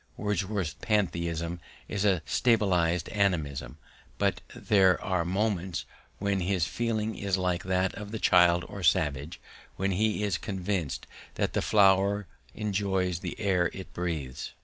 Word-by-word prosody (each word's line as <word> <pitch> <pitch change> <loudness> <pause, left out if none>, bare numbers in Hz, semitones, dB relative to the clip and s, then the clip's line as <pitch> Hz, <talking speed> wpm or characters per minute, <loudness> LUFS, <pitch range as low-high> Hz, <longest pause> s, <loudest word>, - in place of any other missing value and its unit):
Wordsworth's 100 -5 -1
pantheism 85 -5 -1 0.3
is 100 - -2
a 95 -6 +2
subtilized 90 -8 +2
animism, 75 -11 0 0.4
but - - 0
there 95 -3 +4
are 95 -2 0
moments 95 -2 -1 0.3
when 100 -1 0
his 90 -2 +1
feeling 110 +1 -1
is 100 -2 -1
like 90 -1 0
that 95 0 +1
of 105 -1 -7
the 110 - -4
child 90 -3 +4
or 100 - -8
savage 75 -1 +1 0.4
when 95 +1 0
he 105 +2 +1
is 100 -4 0
convinced 95 -6 -3 0.3
that - - -1
the - - +1
flower 100 0 +4 0.3
enjoys 95 -4 0
the - - -6
air 90 -5 +2
it 95 - -9
breathes. 75 -7 -4
95 Hz, 135 wpm, -28 LUFS, 85-100 Hz, 0.4 s, there